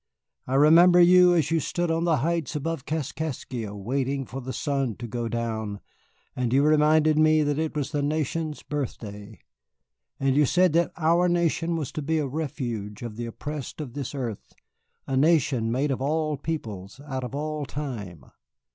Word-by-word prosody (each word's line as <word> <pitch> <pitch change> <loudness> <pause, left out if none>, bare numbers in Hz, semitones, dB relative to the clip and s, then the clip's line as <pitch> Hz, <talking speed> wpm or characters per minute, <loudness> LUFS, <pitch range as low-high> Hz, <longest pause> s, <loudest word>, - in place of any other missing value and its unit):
I 130 - -1
remember 170 +5 +7
you 180 0 +7
as 160 -2 +1
you 165 - +3
stood 175 +2 -1
on 165 +1 0
the 165 -3 +3
heights 165 -5 -1
above 150 -1 -3
Kaskaskia 135 -7 -4
waiting 135 +6 -2
for 135 +2 -7
the 130 +1 -5
sun 135 -6 -1
to 120 - -7
go 120 +1 -3
down, 110 -3 -3 0.6
and 125 -2 -1
you 135 +2 +4
reminded 155 0 +4
me 155 0 +5
that 145 0 0
it 160 -1 -2
was 145 -1 -2
the 145 -1 -1
nation's 155 +1 -2
birthday. 110 -7 -6 0.8
And 135 -1 +1
you 145 -1 +4
said 180 +1 +3
that 170 0 +2
our 170 +2 +3
nation 170 -1 +1
was 155 -5 -3
to 155 - -4
be 160 +3 0
a 150 - 0
refuge 125 -8 -4
of 115 -3 -6
the 120 +1 -4
oppressed 145 +5 -6
of 140 -6 -6
this 140 0 -5
earth, 120 -7 -5 0.5
a 135 - -2
nation 135 -6 +2
made 135 +4 0
of 130 - -2
all 155 +2 0
peoples, 115 - -5
out 130 -2 -3
of 125 +2 -5
all 150 -1 -3
time. 110 - -6
145 Hz, 175 wpm, -26 LUFS, 125-160 Hz, 0.8 s, remember